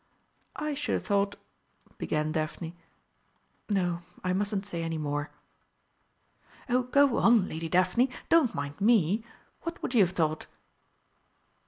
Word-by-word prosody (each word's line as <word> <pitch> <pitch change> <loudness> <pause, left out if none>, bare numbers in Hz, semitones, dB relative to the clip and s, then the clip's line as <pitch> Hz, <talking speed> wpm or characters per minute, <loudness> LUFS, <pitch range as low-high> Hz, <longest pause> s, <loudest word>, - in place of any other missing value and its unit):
"I 300 0 -2
should 290 +1 -2
have - - -1
thought 200 -1 +1 0.3
" - - -33
began 155 0 -1
Daphne; 160 +2 -3 0.9
"no, 175 -4 0 0.2
I 185 0 +1
mustn't 200 +1 -1
say 175 -4 -3
any 165 -1 -2
more." 145 -1 -2 1.4
"Oh, 250 0 +2
go 270 +1 +3
on, 230 -5 +5
Lady 165 +1 -5
Daphne, 185 +10 +3 0.2
don't 325 -7 +4
mind 140 +5 -5
me! 215 -1 +3 0.4
What 335 0 -5
would - - -2
you 225 -5 +6
have 180 - -10
thought?" 155 -2 0
190 Hz, 135 wpm, -29 LUFS, 160-235 Hz, 1.4 s, you